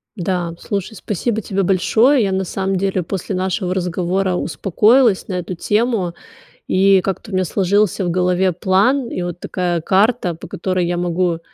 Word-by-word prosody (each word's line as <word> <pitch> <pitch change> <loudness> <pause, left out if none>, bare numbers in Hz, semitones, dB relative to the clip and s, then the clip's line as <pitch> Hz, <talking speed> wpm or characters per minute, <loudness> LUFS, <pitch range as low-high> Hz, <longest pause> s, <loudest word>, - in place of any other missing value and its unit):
Да, 175 -3 -2
слушай, 200 +1 -4
спасибо 220 +3 -2
тебе 195 -1 -1
большое. 220 +8 +3
Я 195 - 0
на 190 0 0
самом 190 +1 -2
деле 190 0 0
после 190 +3 -4
нашего 185 0 -1
разговора 180 +1 -1
успокоилась 210 +6 +2
на 195 - -4
эту 180 +1 -5
тему. 210 -2 0 0.5
И 195 0 +4
как-то 195 +3 -4
у - - -8
меня 185 0 +1
сложился 200 +2 +1
в - - 0
голове 180 +1 +1
план, 200 +10 +1
и - - -3
вот 175 0 -5
такая 175 -2 -2
карта, 200 +1 +2
по 165 - -10
которой 185 0 -2
я 175 0 -1
могу 175 -1 0
190 Hz, 165 wpm, -18 LUFS, 180-200 Hz, 0.5 s, И